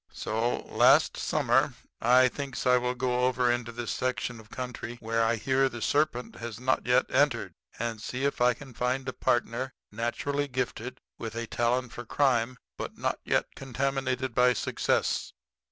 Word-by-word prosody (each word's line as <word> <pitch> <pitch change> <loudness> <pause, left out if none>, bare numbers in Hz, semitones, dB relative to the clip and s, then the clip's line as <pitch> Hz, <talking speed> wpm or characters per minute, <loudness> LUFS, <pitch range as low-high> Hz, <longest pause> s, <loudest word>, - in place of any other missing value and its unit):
"So, 115 +2 -1
last - - +4
summer, - - +2 0.3
I 125 +2 +6
thinks 135 0 -5
I 125 0 +6
will 125 0 -1
go 125 0 +1
over 125 -1 +2
into 120 -1 -2
this 120 -1 -4
section 125 -2 -2
of 110 -1 -15
country 125 -1 -5
where 115 0 0
I 115 +1 +2
hear 135 +4 +2
the 120 - -7
serpent 145 -1 0
has 115 -2 -6
not 130 -1 0
yet 125 - +4
entered, 120 - +2 0.2
and 115 -1 -3
see 130 +5 -3
if 140 - -1
I 125 -1 +5
can 135 0 -12
find 125 +2 -1
a 130 - -2
partner 120 +2 0 0.2
naturally 140 +6 -1
gifted 130 -1 -4 0.2
with 115 -1 -5
a 115 0 -2
talent 120 +2 0
for 120 - -6
crime, 125 -1 +1 0.2
but - - -6
not - - -1
yet - - 0
contaminated 130 -1 -2
by 125 +1 +5
success. - - 0
125 Hz, 170 wpm, -28 LUFS, 120-130 Hz, 0.3 s, I